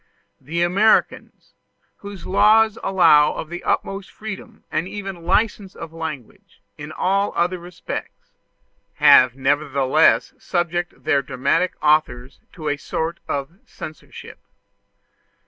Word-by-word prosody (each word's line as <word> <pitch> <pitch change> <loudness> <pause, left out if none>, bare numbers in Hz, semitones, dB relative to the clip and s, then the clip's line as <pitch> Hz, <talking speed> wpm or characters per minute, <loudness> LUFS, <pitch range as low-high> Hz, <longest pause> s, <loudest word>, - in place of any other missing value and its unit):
The 165 +6 -2
Americans, 200 +5 +1 0.4
whose 200 -2 -10
laws 220 +3 +4
allow 165 -6 +4
of 155 - -6
the 175 +1 -7
utmost 195 0 -2
freedom 215 -2 -9
and 165 - -1
even 195 -4 -7
license 205 0 0
of 165 -1 -9
language 155 -10 -8
in 150 +1 -9
all 195 +2 0
other 180 +1 0
respects, 175 0 -8 0.6
have 125 -1 +6
nevertheless 140 +1 +2
subjected 175 -1 -3
their 140 - +2
dramatic 135 +7 -1
authors 145 -4 +1
to 155 -4 -7
a 145 0 0
sort 160 +3 -4
of 140 +7 -4
censorship. 155 - -11
170 Hz, 110 wpm, -21 LUFS, 150-190 Hz, 0.6 s, have